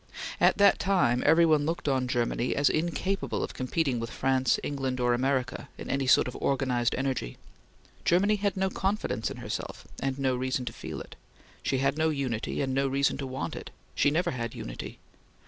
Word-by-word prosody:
At -, -, +4 dB
that 200 Hz, -1 st, +5 dB
time 175 Hz, -11 st, +2 dB
everyone 155 Hz, -2 st, +5 dB
looked 165 Hz, -2 st, -2 dB
on 130 Hz, -2 st, +1 dB
Germany 120 Hz, 0 st, 0 dB
as 145 Hz, 0 st, +3 dB
incapable 175 Hz, +4 st, -1 dB
of -, -, -4 dB
competing 130 Hz, -1 st, -1 dB
with 115 Hz, 0 st, -4 dB
France, 130 Hz, 0 st, +1 dB
England 135 Hz, -3 st, -2 dB
or 120 Hz, 0 st, +2 dB
America 130 Hz, 0 st, -1 dB
in -, -, -5 dB
any 135 Hz, -1 st, 0 dB
sort -, -, +5 dB
of 125 Hz, -, -6 dB
organized 130 Hz, -3 st, +1 dB
energy. 130 Hz, -, -2 dB, 0.7 s
Germany 200 Hz, +5 st, +3 dB
had 200 Hz, -1 st, -1 dB
no 190 Hz, 0 st, +1 dB
confidence 195 Hz, -, -1 dB
in -, -, -7 dB
herself, -, -, -5 dB, 0.2 s
and 135 Hz, -1 st, -1 dB
no 135 Hz, -2 st, +1 dB
reason 130 Hz, 0 st, -1 dB
to 115 Hz, -, -4 dB
feel -, -, -6 dB
it. -, -, -11 dB, 0.5 s
She 135 Hz, -, 0 dB
had 140 Hz, +3 st, +1 dB
no 160 Hz, 0 st, +3 dB
unity, 130 Hz, -7 st, -2 dB
and 130 Hz, -1 st, -1 dB
no 135 Hz, +1 st, +2 dB
reason 140 Hz, +1 st, +1 dB
to 135 Hz, -, -3 dB
want 130 Hz, -9 st, -4 dB
it. -, -, -7 dB, 0.2 s
She -, -, +3 dB
never 160 Hz, +5 st, +1 dB
had 115 Hz, -3 st, -4 dB
unity. -, -, -7 dB
135 Hz, 185 wpm, -28 LUFS, 125-155 Hz, 0.7 s, that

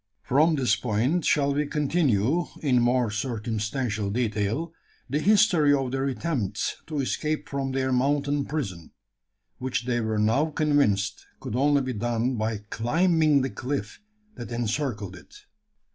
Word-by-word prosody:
From 155 Hz, +5 st, +3 dB
this 125 Hz, -6 st, +2 dB
point 125 Hz, +9 st, 0 dB
shall 140 Hz, -1 st, +2 dB
we 145 Hz, +1 st, 0 dB
continue, 150 Hz, -, +1 dB, 0.2 s
in 125 Hz, -4 st, +3 dB
more 120 Hz, -2 st, +2 dB
circumstantial 110 Hz, -1 st, -2 dB
detail, 115 Hz, +7 st, -1 dB, 0.3 s
the 140 Hz, +4 st, -1 dB
history 180 Hz, -7 st, +4 dB
of 135 Hz, -2 st, -2 dB
their 135 Hz, +1 st, -1 dB
attempts 120 Hz, -, -2 dB
to 150 Hz, -3 st, -2 dB
escape 155 Hz, +3 st, -2 dB
from 135 Hz, -1 st, -3 dB
their 130 Hz, 0 st, 0 dB
mountain 140 Hz, +2 st, +1 dB
prison; 100 Hz, -, -5 dB, 0.7 s
which 125 Hz, -2 st, -2 dB
they 120 Hz, -1 st, 0 dB
were 110 Hz, -1 st, -1 dB
now 115 Hz, +9 st, +2 dB
convinced 145 Hz, -11 st, +1 dB
could -, -, -5 dB
only 140 Hz, +2 st, +3 dB
be 130 Hz, 0 st, -3 dB
done 120 Hz, +3 st, -1 dB
by 110 Hz, -1 st, -2 dB
climbing 155 Hz, +4 st, +3 dB
the 130 Hz, -, -2 dB
cliff 125 Hz, -, -4 dB, 0.3 s
that 120 Hz, -, -8 dB
encircled 115 Hz, -4 st, -2 dB
it. -, -, -15 dB
130 Hz, 140 wpm, -26 LUFS, 110-145 Hz, 0.7 s, history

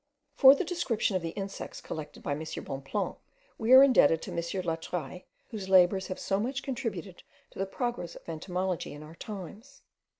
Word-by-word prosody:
For 270 Hz, +1 st, +8 dB
the -, -, -2 dB
description 265 Hz, -, 0 dB
of 185 Hz, -, +1 dB
the 165 Hz, -, -3 dB
insects 195 Hz, 0 st, -5 dB
collected 155 Hz, -2 st, -7 dB
by -, -, -2 dB
M. 145 Hz, -, -1 dB, 0.2 s
Bonpland 135 Hz, +9 st, -3 dB, 0.4 s
we 225 Hz, +2 st, 0 dB
are 260 Hz, +1 st, +11 dB
indebted 195 Hz, -, +5 dB
to -, -, -6 dB
M. -, -, -5 dB
Latreille, 170 Hz, -2 st, -3 dB, 0.3 s
whose 200 Hz, -4 st, -6 dB
labours 190 Hz, +1 st, +5 dB
have 185 Hz, -, -4 dB
so 195 Hz, 0 st, -1 dB
much 260 Hz, +6 st, -2 dB
contributed 210 Hz, -, -4 dB, 0.3 s
to -, -, -12 dB
the 195 Hz, -, 0 dB
progress 240 Hz, -5 st, -3 dB
of -, -, -14 dB
entomology 180 Hz, +2 st, -3 dB
in 145 Hz, +1 st, -9 dB
our 155 Hz, +1 st, -11 dB
times. 205 Hz, -, -9 dB
190 Hz, 175 wpm, -29 LUFS, 170-230 Hz, 0.4 s, are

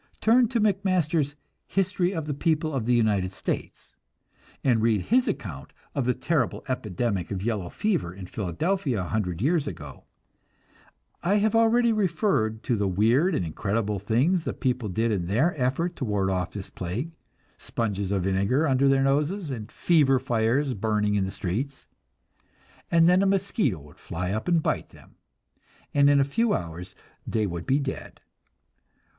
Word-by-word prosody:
Turn 235 Hz, +2 st, +4 dB
to 235 Hz, 0 st, -1 dB
McMasters' 180 Hz, -8 st, +1 dB, 0.3 s
"History 190 Hz, -1 st, 0 dB
of 165 Hz, -5 st, -3 dB
the 150 Hz, -, -2 dB
People 155 Hz, +1 st, 0 dB
of 125 Hz, -4 st, -2 dB
the 125 Hz, -, +4 dB
United 100 Hz, -5 st, +1 dB
States" -, -, -5 dB, 0.7 s
and 120 Hz, -4 st, +3 dB
read 110 Hz, -2 st, +3 dB
his 250 Hz, -, +2 dB
account 85 Hz, -, -5 dB, 0.2 s
of 140 Hz, -, -1 dB
the 125 Hz, -, +1 dB
terrible 130 Hz, -1 st, -1 dB
epidemic 105 Hz, -6 st, -2 dB
of 95 Hz, -2 st, -4 dB
yellow 105 Hz, -6 st, -2 dB
fever 185 Hz, -, -1 dB
in 95 Hz, +1 st, -9 dB
Philadelphia 120 Hz, -, -1 dB
a 90 Hz, -, -5 dB
hundred 95 Hz, -3 st, -2 dB
years 155 Hz, +1 st, +2 dB
ago; 75 Hz, -8 st, -8 dB, 1.2 s
I 190 Hz, +4 st, +2 dB
have 215 Hz, +2 st, +2 dB
already 230 Hz, +1 st, +4 dB
referred 165 Hz, -, 0 dB
to 120 Hz, -, 0 dB
the 100 Hz, -2 st, 0 dB
weird 115 Hz, -, +2 dB
and 90 Hz, -, -1 dB
incredible 105 Hz, +5 st, -2 dB
things 130 Hz, -, +1 dB
the -, -, -3 dB
people 125 Hz, -4 st, -1 dB
did 110 Hz, +5 st, 0 dB
in 90 Hz, -5 st, -1 dB
their 130 Hz, -, +2 dB
effort 150 Hz, +6 st, -1 dB
to 135 Hz, -, -2 dB
ward 100 Hz, -3 st, 0 dB
off 90 Hz, -2 st, -1 dB
this 100 Hz, -3 st, -8 dB
plague 105 Hz, -, -4 dB, 0.5 s
sponges 100 Hz, -4 st, -2 dB
of 95 Hz, -2 st, 0 dB
vinegar 100 Hz, -, +1 dB
under 135 Hz, 0 st, +3 dB
their 135 Hz, 0 st, +4 dB
noses 150 Hz, +5 st, 0 dB
and 110 Hz, -4 st, -6 dB
"fever 145 Hz, -6 st, +3 dB
fires" 125 Hz, +2 st, +1 dB
burning 105 Hz, -1 st, 0 dB
in 100 Hz, -2 st, +1 dB
the -, -, -3 dB
streets; 125 Hz, +12 st, -4 dB, 1.0 s
and 165 Hz, 0 st, +5 dB
then 180 Hz, +2 st, +5 dB
a 195 Hz, -, +3 dB
mosquito 195 Hz, -, 0 dB
would 75 Hz, 0 st, -17 dB
fly 90 Hz, +2 st, -4 dB
up 110 Hz, +2 st, -3 dB
and 170 Hz, -3 st, +2 dB
bite -, -, -1 dB
them, -, -, -18 dB, 0.8 s
and 140 Hz, 0 st, +5 dB
in 145 Hz, 0 st, +5 dB
a -, -, +5 dB
few 210 Hz, +11 st, +1 dB
hours 85 Hz, +3 st, -5 dB, 0.3 s
they 110 Hz, -2 st, 0 dB
would 85 Hz, 0 st, -5 dB
be 135 Hz, +1 st, +3 dB
dead! 140 Hz, -2 st, -5 dB
125 Hz, 165 wpm, -26 LUFS, 100-165 Hz, 1.2 s, and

